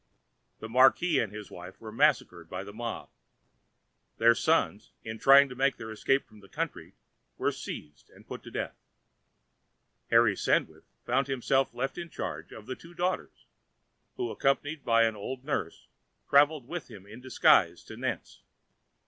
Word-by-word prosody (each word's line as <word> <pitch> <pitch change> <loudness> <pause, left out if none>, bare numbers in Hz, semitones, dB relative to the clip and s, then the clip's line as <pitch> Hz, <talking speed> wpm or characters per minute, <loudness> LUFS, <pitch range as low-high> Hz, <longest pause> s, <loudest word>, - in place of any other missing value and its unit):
The 110 - -8
marquis 130 +6 +4
and 110 - -1
his 105 -1 -9
wife 90 +1 -10
were 110 -1 -9
massacred 85 -6 +1
by 90 +1 -5
the 100 +1 -10
mob. 115 +1 -5 1.1
Their 115 +1 +6
sons, 110 - 0
in 110 0 -6
trying 140 +1 +7
to 125 - -8
make 135 +1 +1
their 110 0 -7
escape 135 +5 +1
from 110 - -18
the 100 -1 -17
country, - - -5 0.4
were - - +1
seized 75 0 -9
and - - -19
put - - -8
to - - -11
death. - - -4 1.3
Harry - - +5
Sandwith - - 0 0.2
found 130 +2 +1
himself 135 -1 0
left 135 +7 -3
in 170 -1 -6
charge - - -6
of 110 - -11
the 130 - -5
two 170 +5 -15
daughters, 180 +2 -3 0.7
who, 370 -1 -3
accompanied 145 +2 0
by 115 -1 +4
an 110 -1 +1
old 125 +5 -6
nurse, 95 - -3 0.4
travelled 145 -2 +4
with 175 0 -6
him 100 -4 -12
in 110 +4 -12
disguise 130 0 +3
to - - -10
Nantes. - - -5
125 Hz, 160 wpm, -29 LUFS, 110-140 Hz, 1.3 s, trying